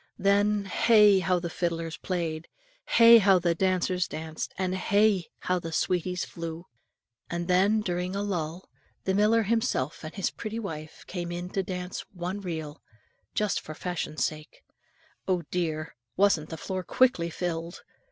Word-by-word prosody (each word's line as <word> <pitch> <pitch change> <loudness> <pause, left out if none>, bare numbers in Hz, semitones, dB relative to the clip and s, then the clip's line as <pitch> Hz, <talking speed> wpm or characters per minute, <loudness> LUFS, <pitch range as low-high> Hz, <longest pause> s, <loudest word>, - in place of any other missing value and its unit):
Then, 205 +1 +2
hey! 210 -1 +5
how 180 0 +1
the 175 0 -3
fiddlers 165 -1 -2
played! 170 -3 -3 0.4
Hey! 230 0 +8
how 195 -2 +5
the 170 -1 +1
dancers 185 0 +1
danced! 160 0 -5
and 185 -1 -1
hey! 200 -1 +2
how 180 0 0
the 165 -1 -6
sweeties 180 +2 0
flew! 165 0 -7 0.6
And 170 0 -3
when, 195 +4 +3
during 180 -1 -2
a 200 - -1
lull, 175 -3 -3 0.4
the 190 - 0
miller 215 +3 +4
himself 205 - -1
and 155 - -7
his 195 - -1
pretty 220 0 -5
wife 160 -8 -6
came 175 -2 -5
in 175 +1 -5
to 195 - 0
dance 180 -1 -5
one 180 +2 -4
reel, 160 -5 -5 0.5
just 210 -3 +1
for 155 - -8
fashion 175 -3 -4
sake, 155 -1 -3 0.6
oh, 180 -2 +1
dear! 160 -3 -2 0.2
wasn't 190 -6 +3
the 160 - -6
floor 185 +2 -3
quickly 245 -5 +2
filled? 170 0 -4
180 Hz, 150 wpm, -28 LUFS, 165-195 Hz, 0.6 s, Hey